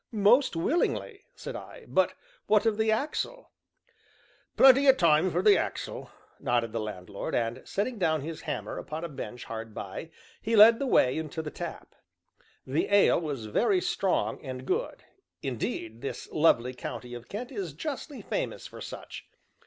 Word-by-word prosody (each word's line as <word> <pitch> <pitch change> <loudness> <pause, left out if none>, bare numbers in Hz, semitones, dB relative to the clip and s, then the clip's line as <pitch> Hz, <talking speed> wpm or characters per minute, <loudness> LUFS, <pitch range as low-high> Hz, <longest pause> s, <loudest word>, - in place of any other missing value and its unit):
"Most 225 +2 +4
willingly," 350 - -1
said - - -7
I, - - -10
"but - - +2 0.3
what 215 +1 +4
of 220 -1 +1
the 220 0 +2
axle?" 305 - -2 1.1
"Plenty 270 +1 +7
o' 265 - +9
time 170 -5 +4
for 175 +1 0
th' 210 -1 +7
axle," - - -3 0.3
nodded 120 -2 0
the 115 - -1
landlord, 100 -3 -5
and 115 0 -1
setting 215 +3 -2
down 160 -4 +2
his 160 +2 -6
hammer - - -4
upon 155 +2 -6
a - - -2
bench 130 -4 -7
hard 115 -1 -7
by, 100 +11 -6 0.3
he 225 +1 0
led 225 +2 +8
the 275 - -1
way 130 - +4
into 160 0 -5
the 150 - -5
tap. - - -7 0.7
The 135 +4 0
ale 200 -4 +5
was 140 -8 -4
very 370 - +2
strong - - 0
and - - -6
good; 440 +7 -2 0.4
indeed 115 -3 -4
this - - -5
lovely 130 -6 +3
county 125 0 -7
of 120 0 -9
Kent 240 +6 -5
is 195 - -4
justly 285 - -6
famous - - -3
for - - -10
such. - - -8
170 Hz, 160 wpm, -28 LUFS, -, 1.1 s, o